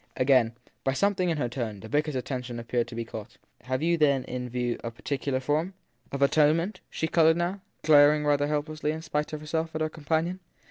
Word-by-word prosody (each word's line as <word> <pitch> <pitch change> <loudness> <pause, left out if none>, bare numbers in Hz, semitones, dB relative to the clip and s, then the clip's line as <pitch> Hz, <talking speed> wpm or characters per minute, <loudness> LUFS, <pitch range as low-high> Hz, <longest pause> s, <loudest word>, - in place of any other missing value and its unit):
Again, 130 -3 +4 0.3
by 135 - +1
something 185 +3 +1
in 165 - 0
her 125 - 0
tone, 115 -4 -4
the 110 - -8
vicar 150 +6 +1
s 145 - -5
attention 125 -2 -4
appeared 120 0 -1
to 120 - -9
be 115 0 -3
caught. 110 0 -9 0.3
Have 130 +3 -1
you 170 0 +2
then 140 -3 +3
in 125 0 -5
view 120 -1 -2
a 115 - -2
particular 135 +3 -2
form? 155 +8 -1 0.4
Of 140 0 0
atonement? 155 +7 +3
She 160 - -2
coloured 160 0 +4
now, 180 +3 -2 0.2
glaring 150 0 +6
rather 145 0 +2
help 150 0 0
lessly, 155 0 -2
in 160 0 -6
spite 150 -1 -2
of 155 -1 -5
herself, 160 +1 -2
at 155 - -2
her 155 - +1
companion. 160 +4 -1
145 Hz, 215 wpm, -27 LUFS, 125-160 Hz, 0.4 s, glaring